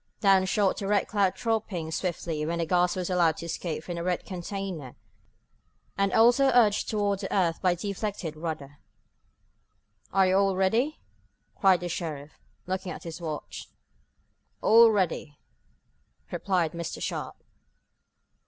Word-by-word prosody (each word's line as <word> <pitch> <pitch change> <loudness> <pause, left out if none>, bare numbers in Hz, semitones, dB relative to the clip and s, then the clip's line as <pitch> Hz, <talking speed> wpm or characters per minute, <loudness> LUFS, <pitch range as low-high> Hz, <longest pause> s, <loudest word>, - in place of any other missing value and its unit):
Down 195 -2 +4
shot 200 0 +1
the 195 - -4
Red 205 -1 +2
Cloud 200 -3 +1
dropping 215 -9 -2
swiftly 165 -3 -2
when 165 +2 -2
the 170 - 0
gas 175 +1 +2
was 180 -2 -2
allowed 170 -3 +3
to 170 - -6
escape 165 -1 -4
from 175 - -5
the 170 - -3
red 180 0 -1
container, 180 -6 -6 1.0
and 195 -1 +1
also 240 +6 +5
urged 215 -4 +4
toward 205 -2 0
the - - -5
earth 175 -4 +1
by 180 -2 +3
the 175 +4 -6
deflected 200 -5 -4
rudder. 155 -3 -6 1.3
"Are 195 0 +4
you 185 +1 +3
all 195 -1 +2
ready?" 225 +11 +1 0.6
cried 190 -3 +4
the 175 - -3
sheriff, 155 -4 -5 0.3
looking 185 0 -3
at - - -8
his 165 0 -7
watch. 155 -3 -6 0.9
"All 230 +1 +7
ready," 180 -8 -1 0.9
replied 180 -5 0
Mr. 170 0 -5
Sharp. - - -4
185 Hz, 145 wpm, -27 LUFS, 165-200 Hz, 1.3 s, All